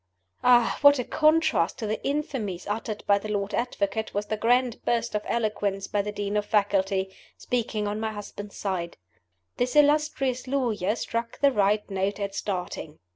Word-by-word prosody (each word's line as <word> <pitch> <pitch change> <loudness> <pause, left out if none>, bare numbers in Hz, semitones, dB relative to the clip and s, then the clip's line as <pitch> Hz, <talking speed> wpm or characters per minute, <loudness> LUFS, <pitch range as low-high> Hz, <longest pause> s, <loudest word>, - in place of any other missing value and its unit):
Ah, 245 -2 +4
what 285 0 +8
a 250 - -1
contrast 310 - +2
to 225 - -4
the 215 +1 -3
infamies 265 - -2
uttered 210 0 -3
by 200 0 +4
the 215 - -7
Lord 205 -1 -2
Advocate 220 -3 -2
was 205 +1 -1
the 215 - -2
grand 245 +2 +1
burst 235 -1 0
of 210 - 0
eloquence 205 -4 -1
by 205 - 0
the 210 +1 -4
Dean 205 0 -3
of 210 0 0
Faculty, 195 -2 +1 0.2
speaking 225 -4 -2
on 205 +1 -2
my 220 0 -2
husband's 205 -1 -8
side! 180 -4 -3 0.6
This 245 +2 0
illustrious 290 -4 +2
lawyer 230 -7 0
struck 230 0 -3
the 280 -1 +5
right 210 -2 +2
note 195 +1 -2
at 200 -1 -3
starting. 180 -6 -4
210 Hz, 170 wpm, -26 LUFS, 200-245 Hz, 0.6 s, what